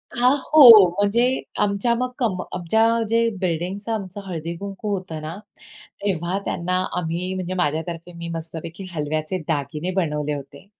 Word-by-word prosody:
हां, 250 +3 +4
हो. 240 - +9
म्हणजे 205 +4 +2 0.4
आमच्या 205 +3 +1
मग 250 +2 -1
कंप 205 -8 0
आमच्या 180 +5 +1 0.3
जे 230 +1 +3
बिल्डिंगचं 185 +4 -2
आमचं 200 -2 -5
हळदी-कुंकू 185 +4 -5
होतं 180 -5 -6
ना, 155 +3 -6 0.7
तेव्हा 185 -1 -1
त्यांना 180 +2 -2 0.2
आम्ही 175 +2 -2
म्हणजे 185 0 -3
माझ्या 160 -4 0
तर्फे, 170 +1 -7
मी 170 0 -7
मस्तपैकी 165 +2 -7
हलव्याचे 155 +2 -2
दागिने 155 +2 -2
बनवले 150 -5 -1
होते 140 +1 -9
180 Hz, 140 wpm, -22 LUFS, 165-200 Hz, 0.7 s, हो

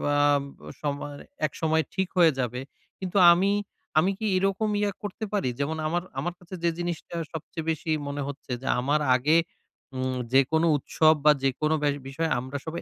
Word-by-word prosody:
আ - - +3 0.6
সময় 145 0 -3 0.3
একসময় 160 0 0
ঠিক 190 -1 0
হয়ে 170 -3 +7
যাবে। 125 0 -2 0.4
কিন্তু 185 +1 -3
আমি, 190 +3 +3 0.5
আমি 185 +5 +3
কি 220 - -3
এরকম 195 +3 +1
ইয়ে 205 -1 +1
করতে 205 +2 -4
পারি 195 -12 +1
যেমন 150 +3 -1
আমার, 175 +2 -1 0.2
আমার 175 - -2
কাছে 180 +1 -9
যে, 170 - +4
জিনিসটা 175 -1 -4 0.2
সবচেয়ে 160 +1 -6
বেশি 160 0 -3 0.2
মনে 140 0 -3
হচ্ছে 140 -2 -8
যে, 135 - -6
আমার 145 +4 +1 0.2
আগে 150 +6 +3 0.6
উম 130 0 -1 0.2
যেকোনো 160 +5 +4
উৎসব 155 +3 +3
বা 150 - +9
যেকোনো 155 +4 +1
ব্যা 145 - +3 0.2
বিষয় 160 +4 -1
আমরা 130 +3 -5
সবাই 165 +1 -4
160 Hz, 170 wpm, -26 LUFS, 140-175 Hz, 0.6 s, বা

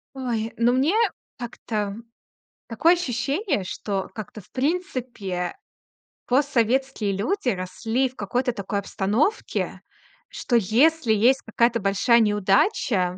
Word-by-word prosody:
Ой, 235 -4 -2
ну, 235 +1 +3
мне 270 +8 +2 0.4
так-то 215 -4 -4 0.7
такое 320 +9 +4
ощущение, 290 - -1
что 195 +1 -3
как-то, 215 0 -8
в - - -26
принципе, 255 - -2 0.7
постсоветские 260 -4 +1
люди 255 - -2
росли 225 +6 -1
в 255 - -22
какой-то 245 +5 -1
такой 200 -2 -3
обстановке, 210 - -1 0.5
что 240 - 0
если 240 - +3
есть 245 +6 +4
какая-то 235 +1 +2
большая 200 +4 +3
неудача 205 - +2
235 Hz, 105 wpm, -24 LUFS, 205-265 Hz, 0.7 s, такое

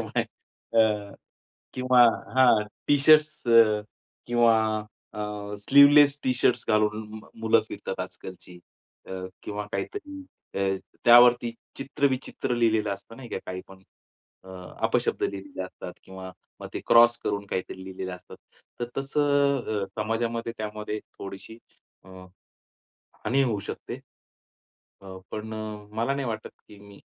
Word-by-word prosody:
त्याच्यामुळे - - -1 0.6
अ, 105 -2 +1 0.6
किंवा 125 -1 +4 0.3
हां. 120 -5 +5 0.2
टी-शर्ट्स 150 0 +4
अ, 110 -2 +6 0.5
किंवा 120 -1 +4 0.6
अ, 105 - -5 0.4
स्लीव्हलेस 140 +1 +7
टी-शर्ट्स 125 -1 +1
घालून 105 0 0
मुलं 110 0 +3
फिरतात 100 -2 -6
आजकालची 90 -1 -9 0.5
अ, - - -8 0.3
किंवा 105 0 -5
काहीतरी 295 -8 -5 0.4
अ, 95 -1 +1 0.3
त्यावरती 120 0 +7 0.3
चित्रविचित्र 135 -2 -1
लिहिलेलं 110 -3 +1
असतं 115 - -15
नाही 125 -1 -10
का - - -4
काही 90 0 -5
पण. 95 0 -15 0.6
अ, - - -14 0.4
अपशब्द - - 0
लिहिलेले 95 -1 -4
असतात 90 -1 -8
किंवा 95 0 -9 0.3
मग - - -7
ते - - -3
क्रॉस 120 0 +6
करून 100 0 -2
काहीतरी 95 -1 -5
लिहिलेले 95 0 -6
असतात. 90 0 -11 0.4
तर - - 0
तसं 140 -5 +1
अ, - - -2
समाजामध्ये 115 +1 -2
त्यामध्ये 105 0 -4 0.2
थोडीशी 100 +3 -9 0.5
अ, - - -17 1.2
हानी 135 +5 +2
होऊ 115 -6 0
शकते. - - -6 1.0
अ, 95 -1 -10
पण 110 +1 -6
अ, 105 -1 -7
मला 115 +5 0
नाही 140 -1 -3
वाटत 110 -1 -5 0.2
की 105 - -14
मी 100 0 -15
110 Hz, 125 wpm, -26 LUFS, 100-125 Hz, 1.2 s, स्लीव्हलेस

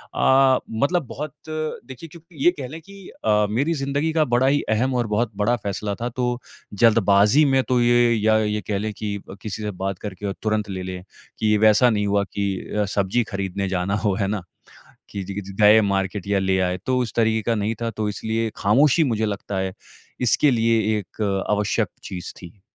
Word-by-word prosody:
अ, 130 -1 +4 0.2
मतलब 170 +1 +1
बहुत 145 +3 -6 0.2
देखिए 155 -2 -6
क्योंकि 165 -2 -10
ये 175 - +7
कह 130 - -4
लें 155 +5 -8
कि 195 +2 -13 0.2
अ, 105 -1 +3
मेरी 135 +10 0
ज़िंदगी 140 +2 -1
का 155 -1 +3
बड़ा 125 +1 +2
ही 145 +1 +3
अहम 120 +4 +1
और 120 - -3
बहुत 110 +2 0
बड़ा 105 +4 +2
फैसला 100 +1 -3
था, 120 - -1
तो 125 0 -2 0.3
जल्दबाज़ी 105 +4 +4
में 135 -1 +3
तो 125 -1 +1
ये 120 0 +4
या 110 0 +3
ये 105 0 -1
कह 105 - 0
लें 110 +2 -2
कि 100 0 -4 0.2
किसी 110 0 -5
से 105 - -2
बात 95 -1 -2
करके 105 -1 -7
और 100 - -3
तुरंत 110 -1 -1
ले 95 -1 -4
लें 90 -1 -6 0.4
कि 105 -1 +2
वैसा 110 +3 +5
नहीं 105 -3 0
हुआ 100 0 +2
कि 100 0 -4 0.3
अ, 105 - +2
सब्जी 100 +5 +1
खरीदने 100 0 -2
जाना 95 +1 -1
हो, 100 - +3
है 100 - +1
ना? 105 0 -2 0.7
कि 100 - -4
जिग 100 +2 -5
जि 100 - -9
जाए 105 +1 +7
मार्केट 100 -1 -1
या 100 0 +1
ले 95 0 +1
आए। 90 0 0
तो 130 - +1
उस 120 -4 -2
तरीके 110 -1 +2
का - - +3
नहीं 105 +1 -1
था 115 - -1
तो 110 -1 -3
इसलिए 110 +2 -2
ख़ामोशी 140 +10 +4
मुझे 110 -5 0
लगता 100 -1 -4
है 95 0 -2 0.5
इसके 125 +4 +3
लिए 115 -2 +2 0.2
एक 100 +2 -11 0.3
आवश्यक 105 -1 +1 0.2
चीज़ 90 -2 -6
थी। 95 +2 -13
110 Hz, 205 wpm, -22 LUFS, 100-125 Hz, 0.7 s, ये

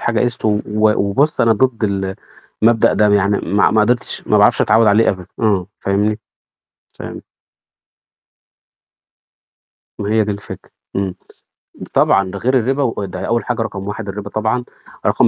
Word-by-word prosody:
حاجة 115 -2 0
قِسْط، 120 -1 -2
و 110 - +3 0.2
و 105 0 +2
وبُص 135 +10 +1
أنا 115 -1 +4
ضد 115 +1 0
ال 95 -2 -2 0.5
المبدأ 115 0 +4
ده، 105 0 +3
يعني 100 0 +2
ما 100 0 +2
ما 110 - +3
قدرتش، 120 +2 0
ما - - +4
باعرفش - - +4
أتعوِّد 110 +1 +4
عليه 105 +2 +4
أبدًا، 90 -2 -2
امم، 100 -6 +1
فاهمني، 105 +2 0 0.8
فاهم؟ - - -8 2.8
ما 100 - -3
هي 110 -1 +3
دي 105 - -3
الفكرة، 100 0 -10 0.3
إمم. 95 -2 -2 0.8
طبعًا، 95 -1 +3
ده 100 - -6
غير 130 +4 +2
الرِبا 135 +4 0
وده 100 -6 -3
أول 115 0 -1
حاجة 120 -2 -2
رقم 100 -3 -5
1 105 +1 -5
الرِبا 105 +1 -6
طبعًا، 110 +4 -1 0.4
رقم - - +4
105 Hz, 155 wpm, -17 LUFS, 100-115 Hz, 2.8 s, أنا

